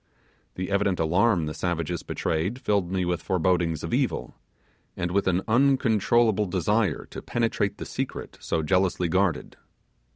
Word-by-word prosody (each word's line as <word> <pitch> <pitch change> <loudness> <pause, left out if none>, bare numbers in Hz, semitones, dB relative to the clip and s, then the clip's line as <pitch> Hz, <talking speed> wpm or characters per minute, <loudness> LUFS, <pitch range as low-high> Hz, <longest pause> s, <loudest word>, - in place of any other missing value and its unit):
The 95 +2 -4
evident 100 -2 +1
alarm 90 +2 +2
the 75 - -4
savages 85 -1 -2
betrayed 90 +10 -2
filled 100 -7 0
me 95 -1 0
with 90 -2 -1
forebodings 85 -2 0
of - - -4
evil, - - -1 0.6
and 85 0 -2
with 100 +1 +1
an 95 +1 +1
uncontrollable 115 -4 +3
desire 95 0 0
to - - -7
penetrate 115 -4 -1
the - - -6
secret - - -5
so 80 - -1
jealously 90 +1 +1
guarded. 90 -3 0
95 Hz, 140 wpm, -26 LUFS, 85-105 Hz, 0.6 s, uncontrollable